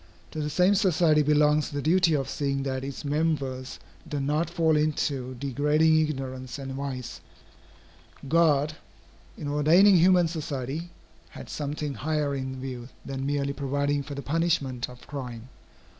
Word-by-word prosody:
To 155 - -5
the 150 - -2
same 180 +6 +3
society 170 -5 +3
belongs 150 0 +3
the 145 - -4
duty 165 +2 +3
of 135 -2 -1
seeing 140 -1 -2
that 130 -1 -3
its 140 +2 -6
members 140 -4 -1 0.3
do 145 -2 -2
not 150 +4 0
fall 165 -3 +2
into 140 -4 -1
degrading 150 +5 +2
ignorance 130 -4 -4
and 135 -1 -6
vice. 130 -2 -5 1.1
God, 155 -1 +3 0.6
in 145 - -5
ordaining 165 +7 +5
human 180 0 +5
society, 155 0 -4 0.4
had - - -10
something 145 0 -3
higher 150 0 -1
in 130 -1 -4
view 130 -2 -6 0.2
than 135 0 -4
merely 140 -1 -1
providing 140 +1 -1
for 140 +1 -7
the 140 - -6
punishment 145 -6 0
of 125 -1 -13
crime. 125 -4 -7
145 Hz, 145 wpm, -27 LUFS, 135-155 Hz, 1.1 s, ordaining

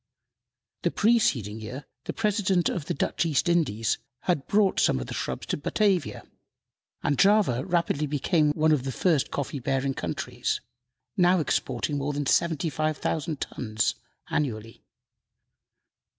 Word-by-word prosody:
The - - +1
preceding 140 - +2
year 125 +6 -7 0.2
the - - -3
President 200 -5 +1
of 165 -6 -3
the - - -1
Dutch - - 0
East 160 +1 +1
Indies 130 -11 +1 0.2
had 170 -7 0
brought 205 -2 +3
some - - +3
of 60 - -4
the - - -7
shrubs - - -3
to - - -2
Batavia, 195 +4 0 0.8
and 145 - +1
Java 195 - +4
rapidly 170 -4 +1
became 150 +2 +2
one 155 0 +2
of 145 -5 +2
the 135 - -3
first 155 0 +1
coffee 140 0 -3
bearing 135 +2 0
countries - - -3 0.6
now 180 0 +4
exporting 140 -1 -1
more 145 +1 -2
than 145 0 -2
75,000 155 0 0
tons 110 -4 -1 0.4
annually. 115 -6 -3
150 Hz, 135 wpm, -27 LUFS, 135-175 Hz, 0.8 s, Java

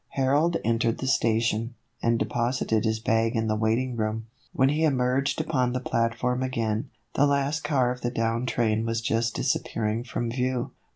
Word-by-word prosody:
Harold 145 +6 +2
entered 115 0 +1
the - - -4
station, 115 -2 +1 0.3
and 115 0 +2
deposited 120 -2 0
his 110 0 0
bag 115 +1 +1
in 110 0 +1
the 110 -1 +1
waiting 115 +4 0
room. 110 0 -2 0.3
When 130 +1 +3
he 155 +3 +1
emerged 135 -1 +1
upon 130 -6 0
the 125 - 0
platform 120 +1 0
again, 115 -1 -1 0.2
the 145 - +4
last 140 +3 0
car 135 -5 +2
of 125 0 -6
the 120 - 0
down 115 +1 -1
train 110 -2 +1
was 115 0 -1
just 115 0 0
disappearing 110 +1 -1
from 120 -1 -3
view. 125 0 -1
120 Hz, 170 wpm, -26 LUFS, 115-130 Hz, 0.3 s, the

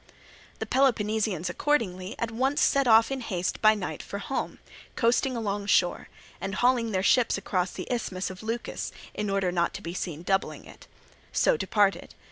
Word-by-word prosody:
The - - -3
Peloponnesians 215 - +1
accordingly 185 -4 -1
at 230 -1 -2
once 265 +5 0
set 275 -2 +3
off 225 +2 +6
in 270 -1 -2
haste 185 -6 -3
by 215 0 +6
night 195 -4 -4
for 200 - -6
home, 265 +6 -3 0.4
coasting 245 +2 +2
along 205 -2 -2
shore; 180 -3 +2 0.3
and 195 +2 -3
hauling 245 -1 +2
their 190 -3 0
ships 240 +1 +3
across 185 -2 -1
the - - -6
Isthmus 190 -6 -3
of 185 - -10
Leucas, 225 +2 -4 0.2
in 210 -1 -3
order 195 -2 +1
not 170 +1 0
to 195 - -6
be 170 - -5
seen 170 -3 -5
doubling 195 +1 -1
it, - - -15 0.4
so - - +3
departed. 205 - 0
210 Hz, 170 wpm, -27 LUFS, 185-235 Hz, 0.4 s, off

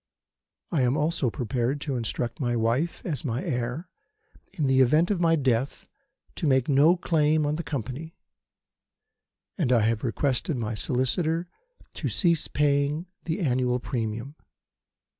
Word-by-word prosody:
I 160 -7 +2
am 125 +3 +2
also 155 -3 +1
prepared 125 +3 -1
to 140 -3 -2
instruct 120 0 -3
my 120 -3 0
wife, 120 +9 0
as 160 -3 -1
my 125 +1 -2
heir, 125 +1 -3 0.6
in 155 - -2
the 135 0 +4
event 155 +9 +4
of 185 -4 0
my 165 -1 +4
death 130 -3 -1 0.5
to 160 - -1
make 130 -3 +3
no 150 +5 +5
claim 155 -3 +2
on 145 +1 0
the 165 - -3
Company; 145 - -5 1.4
and 140 -8 +1
I 120 -3 +5
have 110 +1 +1
requested 130 +3 0
my 115 -1 -2
solicitor 155 - 0 0.5
to - - -3
cease 170 -4 +1
paying 145 +2 +1 0.2
the 165 +3 -2
annual 125 -4 +1
premium. 115 +2 -4
140 Hz, 140 wpm, -26 LUFS, 125-160 Hz, 1.4 s, no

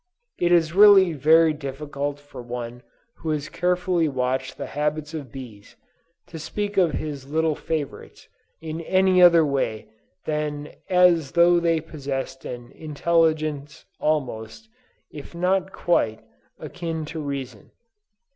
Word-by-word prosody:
It 175 0 +2
is 165 -2 +3
really 195 -3 +7
very 160 +2 +4
difficult 145 0 -5
for 145 -3 -11
one 120 0 -6 0.4
who 160 - -5
has 150 -1 -2
carefully 180 -2 0
watched 130 -1 -2
the - - -5
habits 150 +1 -3
of 145 -7 -6
bees, 115 -7 -11 0.5
to 160 - -9
speak 205 +6 -4
of 175 -5 +3
his 140 -3 -5
little 160 +1 +1
favorites 150 -1 -5 0.3
in 160 0 -5
any 185 +1 +3
other 170 -2 +7
way 135 -6 -2 0.4
than 150 -1 -3 0.2
as 180 -6 +4
though 175 0 +5
they 165 -2 +1
possessed 135 -4 -5
an 120 -1 -7
intelligence 155 -2 -1
almost, 130 - -2 0.4
if 145 +3 -10
not 185 +2 0
quite, 110 -14 0 0.3
akin 165 -3 -5
to 160 +1 -6
reason. 135 -7 -6
155 Hz, 125 wpm, -24 LUFS, 140-170 Hz, 0.5 s, really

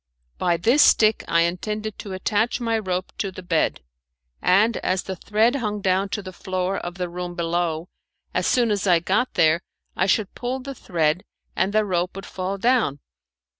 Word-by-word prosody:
By 175 -1 +2
this 235 - +4
stick 215 -5 +5
I 170 - +3
intended 210 +5 -2
to 200 - -6
attach 210 +6 0
my 230 -2 0
rope 185 -3 -3
to 195 - -1
the 185 0 -9
bed, 170 -3 0 0.6
and 210 +5 +4
as 185 0 -1
the 190 - -5
thread 220 +7 +2
hung 210 -4 -2
down 190 0 +1
to 205 +1 -3
the 185 0 -8
floor 185 +1 -2
of 175 0 -6
the 180 -1 -3
room 175 0 -6
below, 170 -1 -1 0.5
as - - 0
soon 240 -3 +3
as 200 -1 0
I 175 -2 +6
got 205 +9 0
there 160 +1 +4 0.3
I 185 - +1
should 205 0 +1
pull 250 +2 -3
the 275 +1 -7
thread 170 - 0 0.3
and 190 - +1
the 215 0 +2
rope 180 -2 -1
would 195 - -7
fall 190 +1 -4
down. 230 - +2
190 Hz, 185 wpm, -23 LUFS, 175-215 Hz, 0.6 s, I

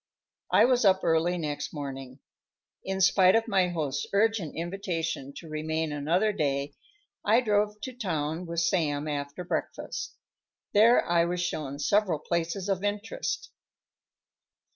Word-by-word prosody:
I - - +6
was 250 -1 +3
up 190 -2 +4
early 165 +2 +2
next 145 -3 -3
morning. 135 -2 -7 0.6
In 190 0 -2
spite 190 0 +5
of 225 0 +2
my 190 -2 +3
host's 150 -5 -2
urgent 210 -5 +1
invitation 170 -5 -3
to 165 - -9
remain 155 0 -2
another 170 +9 +1
day, 140 -3 -1 0.5
I 220 +3 +4
drove 210 -2 +1
to 260 - -5
town 165 - -3
with 170 0 -1
Sam 155 -4 0
after 145 +3 -4
breakfast. 175 - -4 0.6
There 225 +4 +6
I 170 -1 +3
was 175 +1 -2
shown 150 -5 -3
several 190 +3 +2
places 170 +4 -2
of 195 -1 -1
interest. 335 - -3
170 Hz, 135 wpm, -28 LUFS, 150-200 Hz, 0.6 s, I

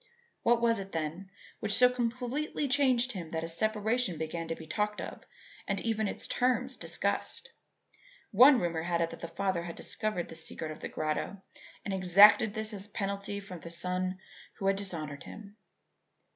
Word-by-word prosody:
What 235 0 +3
was 230 -2 +3
it, 195 0 -8
then, 165 +4 -4 0.3
which 210 -1 +3
so 250 - +8
completely 250 +5 -2
changed 260 -2 +3
him 180 -7 -6
that 160 0 -3
a - - -3
separation 215 +3 +1
began 160 +1 -4
to 165 - -2
be 160 - -10
talked 210 +5 -1
of - - -7 0.5
and 195 -1 0
even 220 -2 0
its - - -3
terms 255 +1 0
discussed? - - -1 0.8
One 255 +5 +8
rumour 170 -2 -1
had 170 0 -1
it 165 0 0
that - - -9
the 170 - -4
father 190 -1 -1
had 170 0 -7
discovered 215 -5 -3
the - - -8
secret 160 -1 -4
of 155 - -9
the - - -6
grotto 155 +5 -3 0.4
and 200 - -2
exacted 200 +4 +6
this 220 0 -3
as 200 0 -6
a - - -24
penalty 200 0 -3
from 190 -3 -9
the 170 - -9
son 180 +2 0 0.4
who 195 - -5
had 195 0 +3
dishonoured 155 -7 -2
him. 205 -1 -11
200 Hz, 180 wpm, -30 LUFS, 170-230 Hz, 0.8 s, so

